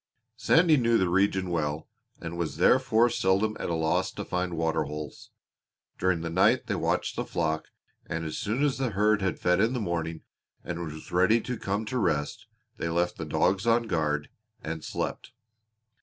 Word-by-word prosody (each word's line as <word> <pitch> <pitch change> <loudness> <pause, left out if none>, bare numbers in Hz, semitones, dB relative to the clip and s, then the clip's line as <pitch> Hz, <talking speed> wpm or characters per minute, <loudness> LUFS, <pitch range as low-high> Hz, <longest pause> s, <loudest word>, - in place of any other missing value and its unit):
Sandy 160 +7 +4
knew 115 -2 +3
the 95 -4 +1
region 95 0 +1
well 75 -2 -2 0.3
and 85 0 -6
was 85 -2 -3
therefore 125 -3 +4
seldom 105 0 +1
at - - -3
a 85 - 0
loss 80 -1 0
to - - -6
find 90 -2 -2
water 80 -1 0
holes. 75 +1 -7 0.7
During 90 -2 +1
the 85 - -3
night 95 +3 +3
they - - -2
watched - - -1
the - - -1
flock, 80 -2 -2 0.4
and 80 0 -3
as 80 - -4
soon 115 +7 -1
as 140 -2 +1
the 130 -2 0
herd 105 0 +2
had 95 -2 -1
fed 90 0 +2
in 115 +3 +2
the 125 - -1
morning 85 -5 -3 0.4
and 85 0 -4
was 80 -1 -8
ready 95 +6 +4
to 125 - -4
come 105 0 -2
to 125 +4 -2
rest 90 +4 -1 0.3
they 85 - -2
left 85 +1 0
the - - -3
dogs 95 +4 +1
on 115 0 +4
guard 75 -8 -1 0.3
and 80 0 -5
slept. 125 - -4
90 Hz, 185 wpm, -27 LUFS, 80-110 Hz, 0.7 s, Sandy